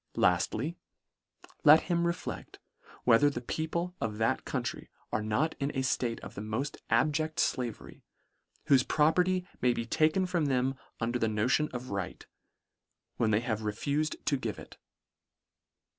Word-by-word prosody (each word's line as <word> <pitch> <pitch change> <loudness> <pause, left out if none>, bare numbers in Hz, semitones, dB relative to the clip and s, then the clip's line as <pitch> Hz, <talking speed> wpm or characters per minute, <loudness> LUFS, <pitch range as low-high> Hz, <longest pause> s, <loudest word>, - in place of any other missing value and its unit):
Laftly, 110 - +1 0.9
let 155 +2 +8
him 170 -1 0
reflect 170 - -5 0.2
— - - -22
whe 115 -2 +6
ther 145 - +5
the 140 - -4
people 165 +7 -3
of 105 -2 -2
that 110 0 0
country - - -3 0.2
are - - 0
not 110 +10 0
in 140 0 0
a 135 - 0
ftate 120 -3 0
of - - -9
the - - -6
moft 110 +7 -3
abject 155 +1 +1
flavery, 120 -4 -2 0.7
whofe 135 -2 +5
property 180 +4 +3 0.2
may 125 0 +4
be 115 - -3
taken 160 +8 +2
from 175 -4 0
them 130 -1 +1 0.3
under 120 +1 -1
the 115 - +2
notion 110 +8 +1
of 125 -1 -6
right, 100 -2 -4 0.9
when 110 - +2
they 105 +1 +3
have 110 -3 -2
refufed 140 +9 -1
to 140 - +2
give 115 -4 -4
it. - - -12
130 Hz, 155 wpm, -30 LUFS, 115-155 Hz, 0.9 s, let